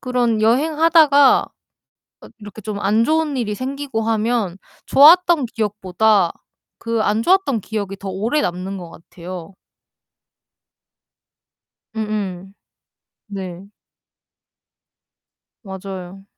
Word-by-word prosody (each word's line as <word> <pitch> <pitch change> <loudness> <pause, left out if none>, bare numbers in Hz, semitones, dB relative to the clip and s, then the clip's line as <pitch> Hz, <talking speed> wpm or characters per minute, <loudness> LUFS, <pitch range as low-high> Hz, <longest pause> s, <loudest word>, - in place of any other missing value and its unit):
그런 245 -4 0
여행하다가 295 +3 +4 0.8
어 - - -12
이렇게 210 0 -11
좀 205 0 -5
안 210 +3 +2
좋은 310 0 0
일이 215 -4 -2
생기고 265 -3 -4
하면 220 -4 -1 0.3
좋았던 330 0 +6
기억보다 210 -3 0 0.5
그 230 -1 -2
안 215 +2 0
좋았던 350 - +2
기억이 200 -1 -5
더 195 - -8
오래 215 +10 -1
남는 185 -2 -3
것 175 -2 -10
같아요. 175 +2 -10 2.4
음음. 200 -4 -4 0.7
네. 190 -3 -7 2.0
맞아요. 190 -1 -9
215 Hz, 190 characters per minute, -19 LUFS, 195-260 Hz, 2.4 s, 좋았던